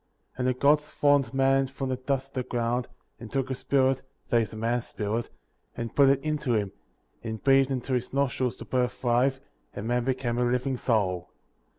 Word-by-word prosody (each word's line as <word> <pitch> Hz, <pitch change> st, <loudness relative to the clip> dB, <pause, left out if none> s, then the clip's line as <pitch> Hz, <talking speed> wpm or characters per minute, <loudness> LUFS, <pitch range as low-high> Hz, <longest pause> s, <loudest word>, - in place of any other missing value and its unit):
7. -, -, -20 dB
And 125 Hz, -, +1 dB
the 130 Hz, 0 st, 0 dB
Gods 150 Hz, +1 st, +3 dB
formed 145 Hz, -4 st, +3 dB
man 135 Hz, 0 st, +3 dB
from 135 Hz, 0 st, -4 dB
the 130 Hz, -, 0 dB
dust 135 Hz, +1 st, -2 dB
of -, -, -32 dB
the -, -, -24 dB
ground, 120 Hz, +1 st, 0 dB, 0.3 s
and 115 Hz, -, -9 dB
took 135 Hz, -1 st, -1 dB
his 130 Hz, -, -3 dB
spirit, 135 Hz, -1 st, +2 dB, 0.3 s
(that 120 Hz, -, +4 dB
is, 110 Hz, -, -3 dB
the 110 Hz, -, -9 dB
man's 115 Hz, +2 st, -1 dB
spirit,) 110 Hz, +3 st, -3 dB, 0.5 s
and 115 Hz, -1 st, -5 dB
put 140 Hz, -1 st, +6 dB
it 135 Hz, 0 st, +4 dB
into 150 Hz, -5 st, 0 dB
him; 100 Hz, -3 st, 0 dB, 0.5 s
and 110 Hz, -2 st, -5 dB
breathed 135 Hz, -1 st, +5 dB
into 130 Hz, 0 st, -2 dB
his 125 Hz, 0 st, -1 dB
nostrils 130 Hz, -2 st, 0 dB
the -, -, -9 dB
breath 125 Hz, -1 st, 0 dB
of -, -, -25 dB
life, 125 Hz, +2 st, +2 dB, 0.4 s
and 105 Hz, -, -5 dB
man 120 Hz, 0 st, +1 dB
became 125 Hz, -2 st, -1 dB
a -, -, +3 dB
living 125 Hz, +2 st, 0 dB
soul. 95 Hz, -8 st, 0 dB
125 Hz, 210 wpm, -27 LUFS, 120-135 Hz, 0.5 s, put